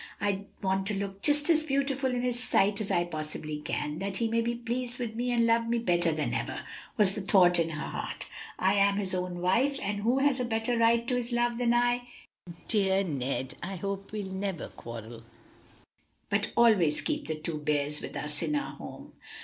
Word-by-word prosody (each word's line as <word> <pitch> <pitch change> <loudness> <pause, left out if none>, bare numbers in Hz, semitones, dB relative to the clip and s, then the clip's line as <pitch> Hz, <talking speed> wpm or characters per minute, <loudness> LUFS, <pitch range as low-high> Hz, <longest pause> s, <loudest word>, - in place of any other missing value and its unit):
"I 200 -1 -1 0.2
want 190 0 +1
to 210 - 0
look 195 0 -4
just 295 +2 +3
as 315 -1 +5
beautiful 275 -2 0
in 245 0 -1
his 245 -1 +1
sight 205 -4 +2
as 205 - -3
I 175 - +2
possibly 155 -2 -4
can, 150 +1 -3
that 195 0 -2
he 230 - +1
may 230 +1 +1
be 235 +1 -1
pleased 240 +1 -3
with 235 -3 -3
me 245 +2 -1
and 235 -1 +3
love 230 0 +3
me 235 +1 +1
better 175 -6 +2
than 155 -1 -1
ever," - - -2 0.4
was 200 -3 +5
the 210 - -3
thought 180 -2 +5
in 165 -1 +1
her 155 -2 -4
heart. - - -5 0.3
"I 190 +1 +3
am 200 0 +3
his 195 -2 -2
own 180 -1 -2
wife, 250 +10 +2
and 205 +1 -2
who 235 +5 +2
has 270 -1 +3
a - - +1
better 225 0 0
right 230 0 +3
to 250 - 0
his 245 0 -2
love 240 0 +1
than 240 -1 +3
I? 245 0 +2 0.6
Dear 195 -2 +2
Ned! 135 -5 -2
I 190 +2 -4
hope 195 +2 -4
we'll 210 -2 -3
never 190 -3 -3
quarrel, 115 0 -9 1.1
but - - +1
always 205 -10 +5
keep - - -2
the 155 - -1
two 155 0 -4
bears 150 0 0
with - - -7
us 150 0 -4
in 300 - 0
our 285 - -3
home." - - -10
200 Hz, 205 wpm, -29 LUFS, 175-240 Hz, 1.1 s, as